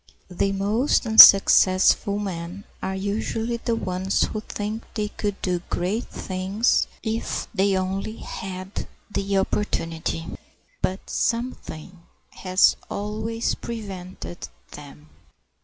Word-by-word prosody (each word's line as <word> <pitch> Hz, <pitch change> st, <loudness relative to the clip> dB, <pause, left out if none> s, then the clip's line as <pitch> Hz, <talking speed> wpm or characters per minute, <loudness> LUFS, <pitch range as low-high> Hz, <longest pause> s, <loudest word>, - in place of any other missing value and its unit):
The 195 Hz, +2 st, 0 dB
most 210 Hz, +8 st, +1 dB
unsuccessful 200 Hz, -2 st, +7 dB
men 185 Hz, -1 st, -5 dB, 0.2 s
are 190 Hz, 0 st, -3 dB
usually 220 Hz, +4 st, -2 dB
the 235 Hz, 0 st, -1 dB
ones 185 Hz, -2 st, -1 dB
who 215 Hz, -, -2 dB
think 215 Hz, +1 st, -5 dB
they 210 Hz, -2 st, -1 dB
could 205 Hz, -1 st, -4 dB
do 180 Hz, -2 st, 0 dB
great 190 Hz, +7 st, -1 dB
things 190 Hz, +5 st, 0 dB, 0.2 s
if 225 Hz, 0 st, -3 dB
they 195 Hz, -1 st, +2 dB
only 195 Hz, +4 st, -3 dB
had 185 Hz, 0 st, -6 dB, 0.2 s
the 200 Hz, -1 st, -1 dB
opportunity. 165 Hz, -5 st, -2 dB, 0.6 s
But 190 Hz, +1 st, -2 dB
something 210 Hz, -8 st, -3 dB, 0.4 s
has 185 Hz, 0 st, +3 dB
always 220 Hz, +3 st, -2 dB
prevented 190 Hz, -6 st, -7 dB, 0.2 s
them. 150 Hz, +1 st, -12 dB
195 Hz, 105 wpm, -24 LUFS, 185-220 Hz, 0.6 s, unsuccessful